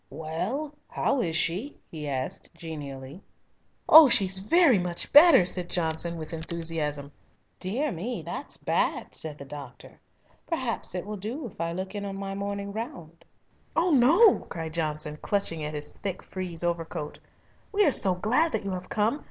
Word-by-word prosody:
"Well, 180 Hz, -, -4 dB
how 270 Hz, -, 0 dB
is 165 Hz, -7 st, -1 dB
she?" 190 Hz, -, -1 dB
he 150 Hz, -3 st, -5 dB
asked 130 Hz, -1 st, -4 dB
genially. 145 Hz, -1 st, -8 dB, 0.7 s
"Oh, 315 Hz, -3 st, +10 dB
she's 195 Hz, -5 st, +4 dB
very 285 Hz, -, +4 dB
much 175 Hz, -1 st, -3 dB
better," 290 Hz, -, +9 dB
said 180 Hz, -1 st, -4 dB
Johnson, 170 Hz, 0 st, -1 dB
with 160 Hz, +1 st, -7 dB
enthusiasm. 160 Hz, -3 st, -4 dB, 0.5 s
"Dear 250 Hz, +10 st, -1 dB
me, 225 Hz, +8 st, -4 dB
that's -, -, -4 dB
bad!" -, -, -1 dB
said 155 Hz, -2 st, -4 dB
the 140 Hz, -, -9 dB
doctor. 145 Hz, 0 st, -11 dB, 0.5 s
"Perhaps 260 Hz, -, -2 dB
it 180 Hz, -, -3 dB
will 210 Hz, 0 st, -5 dB
do 235 Hz, +9 st, -5 dB
if 195 Hz, -7 st, -8 dB
I 165 Hz, 0 st, -1 dB
look 190 Hz, +3 st, -5 dB
in 205 Hz, -1 st, -4 dB
on 200 Hz, -1 st, -5 dB
my 195 Hz, 0 st, -5 dB
morning 200 Hz, 0 st, -4 dB
round?" 170 Hz, -7 st, -7 dB, 0.5 s
"No, 345 Hz, +1 st, +2 dB
no," 320 Hz, -, +6 dB
cried 160 Hz, -1 st, -5 dB
Johnson, 150 Hz, -2 st, -2 dB
clutching 165 Hz, -6 st, -1 dB
at 150 Hz, 0 st, -4 dB
his 150 Hz, 0 st, -6 dB
thick 190 Hz, -2 st, -4 dB
frieze 180 Hz, -3 st, -3 dB
overcoat. 165 Hz, -3 st, -3 dB, 0.5 s
"We 415 Hz, 0 st, +3 dB
are 295 Hz, -, +4 dB
so 190 Hz, -6 st, +5 dB
glad 250 Hz, -, +1 dB
that -, -, -2 dB
you 195 Hz, -, -2 dB
have 185 Hz, 0 st, -6 dB
come. 220 Hz, +7 st, +1 dB
185 Hz, 165 wpm, -27 LUFS, 160-230 Hz, 0.7 s, Oh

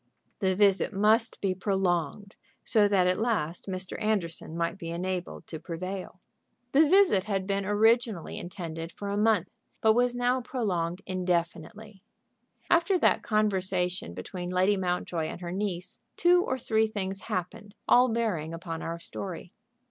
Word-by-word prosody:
The 190 Hz, -2 st, +1 dB
visit 200 Hz, 0 st, +3 dB
must 220 Hz, +4 st, +2 dB
be 195 Hz, -2 st, +1 dB
prolonged 190 Hz, 0 st, -1 dB, 0.3 s
so 210 Hz, -2 st, +4 dB
that 195 Hz, -3 st, +3 dB
at 180 Hz, +2 st, +1 dB
last 205 Hz, -9 st, -1 dB
Mr. 185 Hz, +2 st, -3 dB
Anderson 175 Hz, -6 st, -1 dB
might 170 Hz, +3 st, -2 dB
be 165 Hz, -, -6 dB
enabled 180 Hz, 0 st, -4 dB
to 160 Hz, -, -7 dB
prevail. 185 Hz, +3 st, -6 dB, 0.5 s
The 295 Hz, +2 st, +5 dB
visit 370 Hz, -, +5 dB
had 195 Hz, -3 st, -1 dB
been 195 Hz, 0 st, -1 dB
originally 220 Hz, -, +2 dB
intended 165 Hz, -2 st, -6 dB
for 200 Hz, +3 st, -6 dB
a 200 Hz, -, -1 dB
month, 210 Hz, -3 st, +2 dB, 0.3 s
but 220 Hz, 0 st, +4 dB
was 245 Hz, +1 st, +2 dB
now 245 Hz, +1 st, +1 dB
prolonged 195 Hz, -8 st, -2 dB
indefinitely. 185 Hz, +3 st, -3 dB, 0.7 s
After 345 Hz, +3 st, +3 dB
that -, -, +3 dB
conversation 185 Hz, -, 0 dB
between 175 Hz, -, -6 dB
Lady 185 Hz, +3 st, +3 dB
Mountjoy 180 Hz, -3 st, -2 dB
and -, -, -7 dB
her 175 Hz, -1 st, -5 dB
niece 185 Hz, -2 st, -4 dB, 0.2 s
two 355 Hz, +1 st, +5 dB
or 260 Hz, -, -2 dB
three 220 Hz, -2 st, +1 dB
things 195 Hz, -3 st, -4 dB
happened, 200 Hz, +4 st, -5 dB
all 250 Hz, +1 st, +6 dB
bearing 195 Hz, -9 st, -1 dB
upon 165 Hz, -1 st, -6 dB
our 165 Hz, +1 st, -4 dB
story. 180 Hz, +1 st, -6 dB
190 Hz, 150 wpm, -28 LUFS, 175-220 Hz, 0.7 s, all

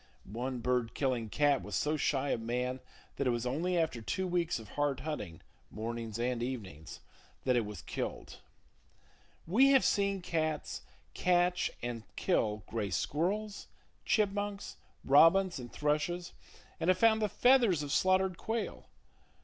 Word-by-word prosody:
One 120 Hz, +4 st, -4 dB
bird 125 Hz, -1 st, 0 dB
killing 125 Hz, -5 st, -1 dB
cat 145 Hz, +3 st, +2 dB
was -, -, -5 dB
so 150 Hz, +1 st, +1 dB
shy 140 Hz, -2 st, 0 dB
of 115 Hz, -, 0 dB
man 125 Hz, +3 st, -2 dB, 0.4 s
that 140 Hz, -, 0 dB
it -, -, +4 dB
was 120 Hz, 0 st, -1 dB
only 170 Hz, +8 st, 0 dB
after 160 Hz, -8 st, 0 dB
two 190 Hz, -, -2 dB
weeks 175 Hz, -1 st, 0 dB
of 110 Hz, -2 st, -10 dB
hard 145 Hz, -2 st, -1 dB
hunting 105 Hz, -, -5 dB, 0.3 s
(mornings 115 Hz, 0 st, -5 dB
and 120 Hz, 0 st, -1 dB
evenings) 100 Hz, -, -6 dB, 0.4 s
that 130 Hz, -1 st, +2 dB
it 115 Hz, -3 st, +1 dB
was 105 Hz, -4 st, -8 dB
killed. -, -, -5 dB, 1.1 s
We 230 Hz, +11 st, +5 dB
have 265 Hz, -, +5 dB
seen 200 Hz, -2 st, +1 dB
cats 155 Hz, -3 st, -2 dB, 0.3 s
catch 180 Hz, 0 st, +2 dB
and 120 Hz, -1 st, -3 dB
kill 105 Hz, -1 st, 0 dB
gray 110 Hz, -3 st, -3 dB
squirrels, 195 Hz, -, -2 dB, 0.4 s
chipmunks, 205 Hz, -1 st, -1 dB, 0.3 s
robins 165 Hz, +4 st, +5 dB
and 120 Hz, -1 st, -8 dB
thrushes, 150 Hz, +4 st, -1 dB, 0.5 s
and 165 Hz, -, -2 dB
have 185 Hz, 0 st, +4 dB
found 220 Hz, +1 st, +4 dB
the 210 Hz, -, +1 dB
feathers 235 Hz, -, +4 dB
of 145 Hz, -, -5 dB
slaughtered 185 Hz, 0 st, +2 dB
quail. 225 Hz, +1 st, -3 dB
150 Hz, 145 wpm, -32 LUFS, 120-185 Hz, 1.1 s, We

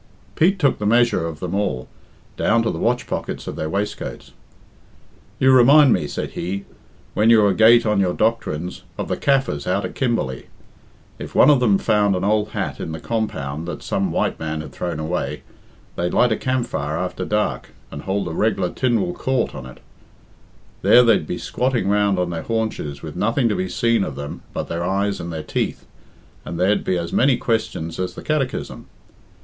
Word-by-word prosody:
Pete 185 Hz, +5 st, +3 dB
took 145 Hz, -7 st, +2 dB
the 105 Hz, -, -1 dB
measure 115 Hz, -6 st, +3 dB
of 80 Hz, -2 st, -7 dB
them 90 Hz, +1 st, -4 dB
all, 95 Hz, -11 st, -1 dB, 0.5 s
down 115 Hz, 0 st, +2 dB
to 115 Hz, -, 0 dB
the -, -, -5 dB
watch 125 Hz, +1 st, 0 dB
pockets -, -, -4 dB
of -, -, -5 dB
their 80 Hz, -, -3 dB
waistcoats. 100 Hz, +3 st, -4 dB, 1.1 s
"You 130 Hz, -, +4 dB
remind 135 Hz, +2 st, +7 dB
me," 75 Hz, -, -1 dB
said -, -, -4 dB
he, 95 Hz, +3 st, -4 dB, 0.5 s
"when 110 Hz, +2 st, +3 dB
you're 110 Hz, -3 st, +6 dB
a -, -, +2 dB
gate 115 Hz, +2 st, +6 dB
on 105 Hz, -2 st, +2 dB
your 90 Hz, -2 st, +1 dB
doctrines, 90 Hz, -7 st, -1 dB, 0.2 s
of -, -, -4 dB
the -, -, 0 dB
Kaffirs 135 Hz, -, 0 dB
out 95 Hz, +2 st, 0 dB
at -, -, -6 dB
Kimberley. 115 Hz, -, -2 dB, 0.7 s
If -, -, -8 dB
one 150 Hz, -, +7 dB
of 140 Hz, -, +4 dB
them 110 Hz, -6 st, +3 dB
found 105 Hz, -2 st, +2 dB
an 90 Hz, -, -2 dB
ould 105 Hz, 0 st, +2 dB
hat -, -, -4 dB
in 80 Hz, -, -5 dB
the 80 Hz, -, -5 dB
compound 80 Hz, -10 st, -3 dB
that 85 Hz, -, -6 dB
some -, -, -1 dB
white -, -, -1 dB
man 80 Hz, -1 st, -3 dB
had 75 Hz, -, -9 dB
thrown 85 Hz, -3 st, -4 dB
away, 80 Hz, -3 st, -3 dB, 0.5 s
they'd 90 Hz, 0 st, -2 dB
light 125 Hz, -1 st, +4 dB
a -, -, +3 dB
camp 130 Hz, -1 st, -1 dB
fire 75 Hz, -8 st, -3 dB
after 90 Hz, +1 st, -3 dB
dark, 105 Hz, +3 st, -1 dB, 0.2 s
and 70 Hz, -, -7 dB
hould 95 Hz, +3 st, -2 dB
a -, -, -4 dB
reg'lar 95 Hz, 0 st, 0 dB
Tynwald 130 Hz, +8 st, 0 dB
Coort 130 Hz, -3 st, 0 dB
on 65 Hz, -1 st, -8 dB
it. 65 Hz, -, -13 dB, 1.0 s
There 125 Hz, -, +7 dB
they'd 110 Hz, -10 st, +3 dB
be -, -, -3 dB
squatting 125 Hz, -4 st, -1 dB
round 100 Hz, -1 st, +2 dB
on 90 Hz, -1 st, -1 dB
their 80 Hz, -1 st, -3 dB
haunches, 110 Hz, -9 st, -3 dB
with 80 Hz, -2 st, -7 dB
nothing 115 Hz, +4 st, +1 dB
to 105 Hz, -, 0 dB
be 95 Hz, 0 st, -2 dB
seen 115 Hz, +4 st, +1 dB
of 75 Hz, -, -5 dB
them 70 Hz, +1 st, -7 dB
but -, -, -4 dB
their 85 Hz, +1 st, -3 dB
eyes 100 Hz, +2 st, 0 dB
and 85 Hz, -, -5 dB
their 80 Hz, -1 st, -5 dB
teeth, -, -, -3 dB, 0.6 s
and 85 Hz, -, -6 dB
there'd 95 Hz, +3 st, +2 dB
be 90 Hz, -, 0 dB
as 85 Hz, -1 st, -4 dB
many 130 Hz, 0 st, +4 dB
questions 110 Hz, -10 st, -2 dB
as 90 Hz, 0 st, -3 dB
the -, -, -9 dB
Catechism. 150 Hz, -4 st, -2 dB
100 Hz, 195 wpm, -21 LUFS, 85-115 Hz, 1.1 s, remind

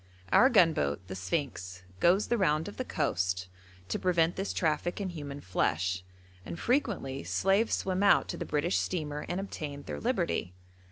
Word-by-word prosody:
Our 260 Hz, -, +7 dB
gunboat, 155 Hz, -, +3 dB
the 95 Hz, -, -4 dB
Sphinx, 95 Hz, -, -3 dB, 0.2 s
goes 185 Hz, +4 st, +4 dB
the 240 Hz, -, +2 dB
round 155 Hz, -4 st, +2 dB
of 205 Hz, -, -8 dB
the 255 Hz, -, -1 dB
coast 90 Hz, -, -1 dB, 0.4 s
to -, -, -1 dB
prevent 175 Hz, -2 st, +2 dB
this 195 Hz, +1 st, -2 dB
traffic 170 Hz, +2 st, 0 dB
in 195 Hz, -2 st, -2 dB
human 145 Hz, -4 st, -7 dB
flesh, 95 Hz, 0 st, 0 dB, 0.4 s
and 170 Hz, -, -7 dB
frequently 215 Hz, -, 0 dB
slaves 195 Hz, +4 st, +2 dB
swim 190 Hz, 0 st, -1 dB
out 200 Hz, -, +5 dB
to -, -, -3 dB
the -, -, -3 dB
British 150 Hz, +5 st, 0 dB
steamer 150 Hz, -4 st, -3 dB
and 175 Hz, -, -1 dB
obtain 145 Hz, -7 st, -5 dB
their 75 Hz, -, -5 dB
liberty. 90 Hz, +4 st, -1 dB
155 Hz, 165 wpm, -30 LUFS, -, 0.4 s, Our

